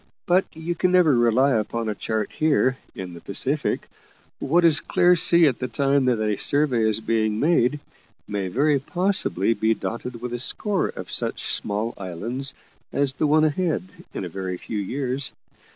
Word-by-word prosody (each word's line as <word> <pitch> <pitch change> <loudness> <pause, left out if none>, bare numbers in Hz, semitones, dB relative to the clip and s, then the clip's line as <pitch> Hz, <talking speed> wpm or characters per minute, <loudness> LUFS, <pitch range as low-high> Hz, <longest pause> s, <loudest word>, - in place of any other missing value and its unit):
But 180 +2 +3
you 160 +2 -3
can 180 +1 +1
never 175 -6 +5
rely 120 +3 +3
upon 115 0 -1
a 105 - -1
chart 110 0 -3
here, 145 -4 +2 0.2
in 90 -2 -7
the 85 - -11
Pacific; 140 +9 -1 0.5
what 170 +5 +2
is 155 -3 +5
clear 180 0 +3
sea 170 0 +5
at 135 -5 +1
the 130 - -2
time 135 +2 +1
that 125 -3 +2
a 105 -2 0
survey 130 -7 +2
is 110 0 +1
being 110 -1 0
made, 150 -2 +2 0.5
may 100 -2 -3
very 140 +8 +2
possibly 175 - 0
be 110 +1 +1
dotted 115 +2 -5
with 120 0 -5
a 120 - -3
score 200 - 0
of - - -8
such - - -1
small 105 +3 -2
islands 115 +10 -3 0.4
as 140 -2 +1
the 150 +3 0
one 155 +1 +4
ahead 160 +3 0 0.3
in - - -5
a - - -4
very 90 +1 -5
few 105 +3 -5
years. 130 +5 -2
130 Hz, 175 wpm, -23 LUFS, 110-155 Hz, 0.5 s, never